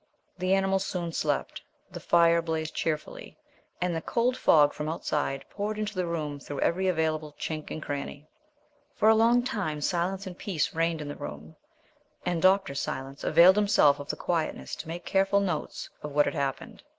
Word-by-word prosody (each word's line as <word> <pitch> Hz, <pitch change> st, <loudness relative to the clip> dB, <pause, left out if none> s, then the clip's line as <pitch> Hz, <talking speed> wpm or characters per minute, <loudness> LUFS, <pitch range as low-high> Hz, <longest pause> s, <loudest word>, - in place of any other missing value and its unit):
The 185 Hz, +1 st, +1 dB
animals 195 Hz, 0 st, +1 dB
soon 175 Hz, -3 st, -3 dB
slept; 150 Hz, -3 st, -2 dB, 0.3 s
the -, -, -7 dB
fire 170 Hz, 0 st, +4 dB
blazed 160 Hz, -1 st, -3 dB
cheerfully; 155 Hz, -2 st, -4 dB, 0.4 s
and 180 Hz, -1 st, 0 dB
the 165 Hz, -, -2 dB
cold 240 Hz, +8 st, 0 dB
fog 150 Hz, -10 st, +5 dB
from 150 Hz, +1 st, -4 dB
outside 145 Hz, -4 st, -2 dB
poured 210 Hz, +1 st, -3 dB
into 215 Hz, 0 st, -3 dB
the 185 Hz, -3 st, -2 dB
room 150 Hz, -4 st, -3 dB
through 140 Hz, 0 st, -6 dB
every 190 Hz, +3 st, +1 dB
available 155 Hz, -3 st, -1 dB
chink 155 Hz, -1 st, -4 dB
and 155 Hz, -, -5 dB
crannie. 145 Hz, +1 st, -5 dB, 0.7 s
For 215 Hz, -, +4 dB
a 220 Hz, -, +7 dB
long 235 Hz, +2 st, +4 dB
time 205 Hz, -, -2 dB
silence 185 Hz, +5 st, -1 dB
and 185 Hz, -2 st, -7 dB
peace 180 Hz, -5 st, -2 dB
reigned 165 Hz, -1 st, 0 dB
in 150 Hz, -, -6 dB
the 145 Hz, -, -5 dB
room 75 Hz, +2 st, -8 dB, 0.7 s
and 175 Hz, -2 st, 0 dB
Dr. 190 Hz, -3 st, +4 dB
Silence 135 Hz, 0 st, -5 dB
availed 175 Hz, +5 st, +6 dB
himself 150 Hz, -9 st, +4 dB
of 145 Hz, -, -8 dB
the -, -, -1 dB
quietness 165 Hz, -3 st, -2 dB
to -, -, -8 dB
make 170 Hz, +1 st, -6 dB
careful 195 Hz, +1 st, +2 dB
notes 195 Hz, -3 st, -3 dB
of 150 Hz, -1 st, -6 dB
what 145 Hz, 0 st, +4 dB
had -, -, -1 dB
happened. 140 Hz, -4 st, -3 dB
165 Hz, 180 wpm, -28 LUFS, 150-190 Hz, 0.7 s, a